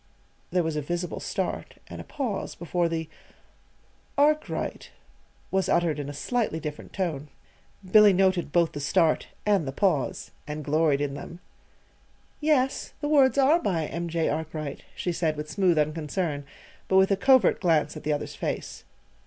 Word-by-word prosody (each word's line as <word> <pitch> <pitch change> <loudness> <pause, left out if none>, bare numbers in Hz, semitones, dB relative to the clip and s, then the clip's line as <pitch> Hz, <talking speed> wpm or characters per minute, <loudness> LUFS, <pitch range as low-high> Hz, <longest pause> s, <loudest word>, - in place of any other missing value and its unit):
there 180 0 +1
was 160 -1 -2
a 150 - -1
visible 175 +4 -3
start, - - -3
and - - -8
a - - -9
pause 245 -9 -4
before 175 0 -1
the 160 -1 -3 1.1
"'Arkwright'" 300 +2 0 0.6
was 190 0 +1
uttered 170 -4 +2
in 145 -1 -4
a - - -4
slightly 210 - -1
different 150 -1 -7
tone. 160 -7 -3 0.6
Billy 210 0 +8
noted 185 -4 +2
both 170 0 +3
the 145 - -6
start 155 +2 +2 0.2
and 200 -8 +2
the - - -2
pause 155 -3 0 0.2
and 150 0 -5
gloried 150 -1 +2
in 145 -1 -1
them. 170 +4 -8 1.0
"Yes; 290 -4 +1
the 295 - -2
words 280 -3 +4
are 285 +5 +4
by 170 - 0
M. 170 +3 -4
J. 165 -1 0
Arkwright," 155 -2 -4
she 180 - -2
said 160 -2 -1
with 150 0 -5
smooth 185 -5 +2
unconcern, 150 0 -1 0.4
but 190 - +3
with 190 +1 +5
a - - +5
covert 260 0 +4
glance 160 -5 +2
at - - -7
the 150 - -1
other's 145 - -2
face. - - -4
170 Hz, 160 wpm, -26 LUFS, 150-195 Hz, 1.1 s, Billy